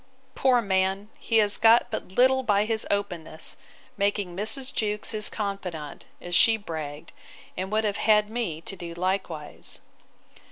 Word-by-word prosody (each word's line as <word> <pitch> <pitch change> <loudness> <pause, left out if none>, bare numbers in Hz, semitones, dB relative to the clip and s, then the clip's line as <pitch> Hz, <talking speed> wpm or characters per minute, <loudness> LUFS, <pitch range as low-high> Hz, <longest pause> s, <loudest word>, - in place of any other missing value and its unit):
Poor 250 -3 +3
man! 190 +1 0
he 225 - +1
has 205 -2 +4
got 225 +1 +5
but - - -5
little 260 +4 +4
by 210 -4 +2
his 220 0 -1
openness, 175 -6 -2 0.4
making 200 -3 0
Mrs. 255 +7 +1
Jewkes 210 -1 -1
his 215 -1 +1
confidant, 185 -8 -5
as 175 - -7
she 225 +5 +5
bragged, 155 -5 -7 0.4
and 190 +1 -4
would 215 +1 +1
have 205 -2 -1
had 210 -1 +4
me 215 -9 -3
to 195 - -6
do 170 -2 -8
likewise. 180 -4 -3
200 Hz, 150 wpm, -26 LUFS, 175-220 Hz, 0.4 s, got